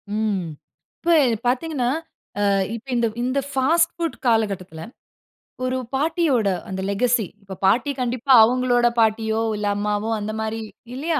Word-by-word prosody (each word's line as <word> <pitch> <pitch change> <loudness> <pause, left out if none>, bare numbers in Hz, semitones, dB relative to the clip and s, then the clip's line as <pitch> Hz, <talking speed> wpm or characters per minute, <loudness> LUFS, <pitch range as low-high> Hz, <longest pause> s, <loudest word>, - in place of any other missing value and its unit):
ம். 210 -4 -1 0.6
இப்ப 340 0 +3 0.3
பார்த்தீங்கன்னா, 260 -1 0 0.6
அ - - +3 0.3
இப்ப 230 +3 -10
இந்த 235 -1 +2 0.2
இந்த 255 +3 0
ஃபாஸ்ட் 330 +6 +2
ஃபுட் 335 -5 -3
காலகட்டத்துல, 195 -7 0 0.8
ஒரு 255 0 -1 0.2
பாட்டியோட 290 - +1 0.2
அந்த 190 0 -4
லெகசி 235 +2 +1 0.2
இப்ப 190 -1 -9
பாட்டி 240 +9 +3
கண்டிப்பா 250 +2 -1
அவங்களோட 245 +1 +3
பாட்டியோ, 220 0 +2 0.2
இல்ல 205 0 -2
அம்மாவோ 210 +1 -1
அந்த 210 +1 -4
மாரி 220 +1 -3 0.3
இல்லையா, 310 +3 -1
240 Hz, 130 wpm, -22 LUFS, 215-265 Hz, 0.8 s, இப்ப